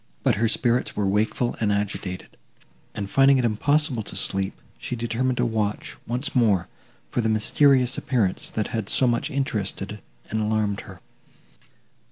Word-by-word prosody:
But - - +4
her 115 - +4
spirits 120 +2 +1
were 105 - 0
wakeful 110 +5 0
and 105 -2 +1
agitated, 100 -2 -3 0.7
and, 100 -2 -3
finding 135 +5 +5
it 125 - +1
impossible 140 +3 +2
to 105 - -8
sleep, 95 0 -1 0.2
she - - -4
determined 120 +2 -1
to 125 - +2
watch, 110 -3 -2
once 125 +4 -2
more, 105 -8 +3 0.4
for 120 - 0
the 110 - 0
mysterious 125 +4 +3
appearance, 110 -8 0
that 110 - -2
had 110 -4 -3
so 130 - +3
much 120 +4 +1
interested 105 -7 -3 0.3
and 110 +1 0
alarmed 105 -2 0
her. - - -12
110 Hz, 155 wpm, -24 LUFS, 105-125 Hz, 0.7 s, finding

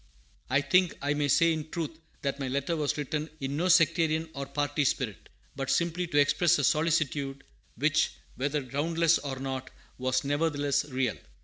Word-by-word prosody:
I 135 +3 +3
think 180 +4 +2
I 145 +1 0
may 145 -1 0
say 165 +4 +4
in 155 -1 -5
truth 160 -1 -4 0.2
that 140 0 -2
my 135 - -2
letter 140 +5 -1
was 150 -2 -1
written 150 +2 -3
in 135 +1 -3
no 170 +5 0
sectarian 165 -2 +3
or 140 -2 -5
party 145 +1 -1
spirit, 125 -6 -2 0.3
but 135 -1 -3
simply 170 +3 +1
to 145 - -1
express 170 +4 +4
a - - -1
solicitude, 150 -4 +1 0.3
which, 155 +1 +2 0.2
whether 145 +2 -1
groundless 165 +5 +2
or 135 -2 -5
not, 130 -1 -4 0.3
was 130 0 0
nevertheless 145 -1 0
real. 130 - -1
145 Hz, 170 wpm, -29 LUFS, 135-160 Hz, 0.3 s, say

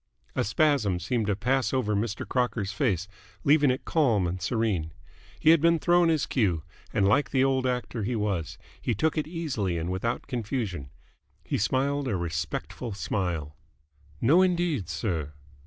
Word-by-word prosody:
A - - +1
spasm 110 - +2
seemed 110 +4 -1
to 105 - +1
pass 125 +5 +1
over 105 -5 +1
Mr. 105 0 -2
Crocker's 120 -6 0
face, 100 - 0 0.4
leaving 145 0 +5
it 130 +1 -1
calm 120 - +2
and 90 +1 -3
serene. 100 - -1 0.5
He 160 - +6
had 165 -2 +5
been 170 +1 +4
thrown 175 +1 +3
his 155 -3 +2
cue, 90 - 0 0.3
and 100 -1 +2
like 140 +7 +3
the 130 -1 +2
old 130 -1 +2
actor 125 -2 -2
he 115 +4 -1
was 90 -6 -2 0.2
he 120 - 0
took 160 +9 +1
it 155 -2 -1
easily 140 - -2
and 85 +2 -2
without 115 +6 -2
confusion. 110 - -3 0.5
He - - -2
smiled 135 +5 0
a 110 - 0
respectful 85 - -4
smile. 85 -7 -2 0.6
"No, 155 +10 +5
indeed, 175 - +1
sir." 80 - -2
115 Hz, 160 wpm, -27 LUFS, 95-140 Hz, 0.6 s, He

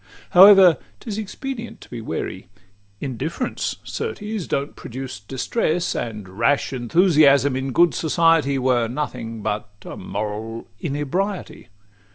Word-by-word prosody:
However, 190 -2 +8 0.2
't - - -18
is 215 -1 -3
expedient 235 +3 -6
to - - -14
be 120 -2 -6
wary: 110 - -5 0.5
Indifference 145 - -3
certes 220 - -4
don't 140 +1 -2
produce 130 -2 -7
distress; 155 - -1
And 105 -4 -4
rash 130 +9 0
enthusiasm 140 - +4
in 130 +1 -2
good 175 +6 +4
society 160 -3 +2
Were 125 -3 +2
nothing 115 -4 -5
but 105 0 -2 0.2
a - - -7
moral 105 +4 -5
inebriety. 175 +6 -3
140 Hz, 120 wpm, -22 LUFS, 120-180 Hz, 0.5 s, However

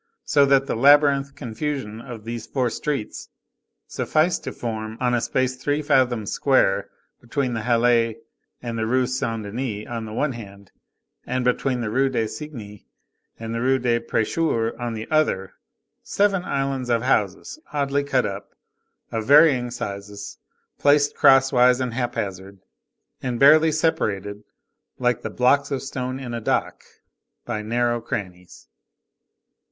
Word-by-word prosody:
So 140 -1 +4
that 135 0 +4
the - - -2
labyrinthine 140 +2 +4
confusion 120 -3 -4
of 120 -4 -9
these 115 0 -6
four 125 -3 -1
streets 140 -6 -4 0.6
sufficed 160 +3 0
to - - -3
form, 110 -1 -5
on 125 -1 +1
a 120 - +1
space 130 +1 0
three 145 +3 -1
fathoms 120 -7 +1
square, 130 -8 +2 0.3
between 125 +1 -2
the 110 - -2
Halles 115 -1 +2 0.5
and 115 -2 -4
the 110 - -1
Rue 130 +2 +2
Saint 115 -3 -2
Denis 105 0 -4
on 115 -2 -5
the 110 - -8
one 145 +5 0
hand, 100 -5 -11 0.6
and 125 0 -1
between 125 0 0
the 110 -2 -3
Rue 135 +3 +2
du 115 -4 -1
Cygne 110 -7 -8 0.6
and 115 0 -6
the 115 - -2
Rue 130 +2 +3
des 120 -2 +1
Prêcheurs 115 +1 0
on 120 -1 -3
the 110 0 -6
other, 150 -12 +1 0.5
seven 200 -2 +1
islands 135 -4 -2
of 115 -1 +1
houses, 110 - -1
oddly 140 -1 0
cut 135 -3 +1
up, 100 0 -6 0.6
of 110 -1 -3
varying 140 -4 +6
sizes, 100 -3 -7 0.4
placed 145 0 +3
crosswise 130 -2 +5
and 125 -2 -2
hap 120 0 -2
hazard, 95 0 -5 0.6
and 125 -2 -3
barely 155 +3 +6
separated, 105 - -1 0.5
like 125 -3 0
the 110 - -4
blocks 125 +5 +2
of 135 -3 -3
stone 130 -1 -4
in 125 -3 -6
a 115 - -4
dock, - - -1 0.6
by 115 -3 -3
narrow 120 +2 0
crannies. 95 -7 -7
120 Hz, 145 wpm, -23 LUFS, 110-135 Hz, 0.6 s, varying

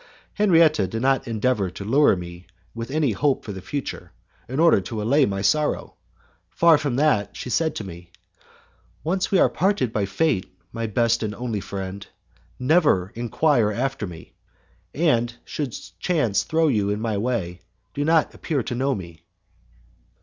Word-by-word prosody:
Henriette 170 -6 +5 0.2
did 110 - -7
not 135 -1 +2
endeavour 110 -3 0
to 100 +2 -8
lure 135 +2 +4
me 85 0 -9 0.3
with 115 +1 -6
any 145 -3 +1
hope 135 +6 0
for 105 - -5
the 95 -2 -7
future, 140 +7 -5 0.4
in 130 +3 -3
order 165 -11 +5
to 110 +3 -5
allay 135 +7 +3
my 100 -1 -3
sorrow! 150 +9 +1 0.6
Far 165 -3 +4
from 145 -4 -2
that, 125 -8 +1
she 125 - -6
said 160 +3 +1
to - - -4
me, 85 -2 -10 0.9
"Once 185 +5 0
we 195 - +3
are - - +5
parted 185 - 0
by 100 -2 0
fate, 100 - -1
my 115 -1 -3
best 115 +2 +1
and 105 -2 -3
only 120 -3 -3
friend, 100 0 -6 0.5
never 130 - +2
enquire 120 0 +1
after 125 -1 -2
me, 85 -2 -11 0.6
and, 120 -7 +1
should 140 -6 -4 0.2
chance 145 - +1
throw 160 0 +2
you 105 -8 +1
in 105 +1 -1
my 110 -1 -1
way, 100 -7 -2 0.3
do 145 - -2
not 160 0 +2
appear 145 -7 -2
to - - -4
know 135 +2 0
me." 85 -4 -9
120 Hz, 165 wpm, -23 LUFS, 100-150 Hz, 0.9 s, Henriette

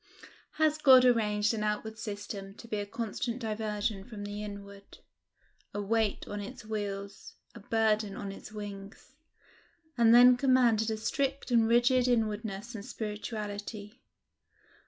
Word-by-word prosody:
Has 310 -1 +2
God 260 -4 +7
arranged 215 -3 +2
an 215 -1 -2
outward 215 +1 -3
system 205 -2 -6
to 230 - -12
be 215 - -3
a 205 0 -3
constant 230 +2 -3
diversion 215 -3 -3
from 210 -1 -9
the 205 +1 -5
inward 200 -1 -10 0.8
a - - -1
weight 215 0 0
on 205 0 -5
its 205 +1 -9
wheels 200 -2 -5 0.2
a 230 - -11
burden 215 -1 +1
on 200 -1 -5
its 195 - -11
wings 205 +3 -9 0.9
and 230 -1 +6
then 245 +1 +8
commanded 245 -4 +3
a 220 - -2
strict 275 +4 -2
and 230 -2 +4
rigid 245 +2 +4
inwardness 220 -1 -1
and 210 -3 -7
spirituality? 210 0 -6
215 Hz, 135 wpm, -30 LUFS, 205-235 Hz, 0.9 s, then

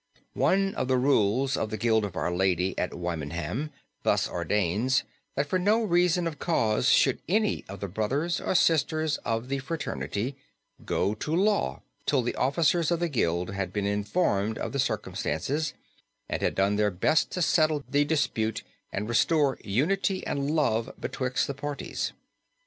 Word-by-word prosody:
One 195 0 +2
of - - -2
the 130 0 +3
rules 130 0 +2
of 110 - -2
the 110 - -3
Guild 110 0 +2
of 95 -3 -7
our 85 +2 -1
Lady 95 0 +1
at 90 - -2
Wymondham 85 - -3 0.3
thus - - +2
ordains, 105 +6 +1 0.3
that 140 - +1
for 185 +5 0
no 215 +5 +3
manner 175 -2 +2
of 155 -2 -5
cause 115 -8 +2
should 135 - +4
any 215 +2 +1
of 100 -1 -8
the 100 - -2
brothers 130 - -1
or - - -1
sisters 155 -2 +2
of 115 +1 -2
the 135 +1 -1
fraternity 135 -4 -3 0.5
go 100 - 0
to 150 +9 -2
law 205 +3 +1 0.2
till 135 -4 +2
the 120 - -1
officers 155 +4 +2
of 170 -1 +1
the 175 -1 0
guild 90 - 0
had 95 -2 -3
been 100 0 -2
informed 105 - 0
of - - -3
the 140 - -2
circumstances 145 +2 -1 0.5
and - - -3
had - - 0
done 100 +1 +2
their 105 0 +3
best 100 - +2
to 180 - 0
settle 155 -2 +2
the 145 +1 +3
dispute 140 -8 0 0.3
and 105 +2 -3
restore 140 +4 +2
"unity 185 - 0
and 140 0 -1
love 130 -6 +1
betwixt 125 -1 -1
the 140 - -3
parties." 145 +1 -4
130 Hz, 165 wpm, -27 LUFS, 105-155 Hz, 0.5 s, should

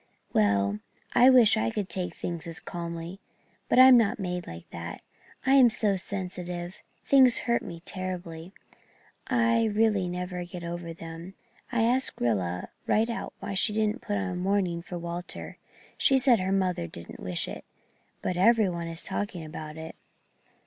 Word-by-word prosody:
Well, 100 -1 +2 0.3
I 245 +1 +7
wish 245 -5 +6
I 110 +1 +1
could 200 - -3
take 180 -3 -3
things 170 -2 -5
as 165 +2 -4
calmly 170 +1 -6 0.5
but - - +3
I'm 255 0 +10
not 220 -3 +1
made 180 -3 -4
like 85 0 -9
that. 85 0 -7 0.4
I'm 265 -2 +7
so 215 -3 +1
sensitive 180 -1 -5 0.3
things 260 -3 +5
hurt 235 -1 +2
me 170 -1 -8
terribly 180 -2 -5 0.8
I 230 -2 +3
really 210 -3 +2
never 180 0 -4
get 175 0 -8
over 170 0 -5
them. 165 +3 -9 0.4
I 235 -2 +2
asked 250 +3 +1
Rilla 95 -7 -1 0.2
right 225 +2 +2
out 230 - -5
why 200 - -4
she 200 +3 +2
didn't 215 +3 0
put 205 -2 -2
on 190 -2 -2
mourning 185 -2 0
for 175 +1 -7
Walter. 170 +1 -6 0.4
She 270 - +4
said 255 -4 +5
her 185 +1 -1
mother 185 - 0
didn't 85 +1 -10
wish 90 -1 -3
it. - - -7 0.6
But 180 - -1
every 220 +1 +5
one 170 -1 -4
is 165 0 -4
talking 190 -4 -4
about 155 0 -8
it." 160 0 -8
180 Hz, 160 wpm, -28 LUFS, 170-215 Hz, 0.8 s, I'm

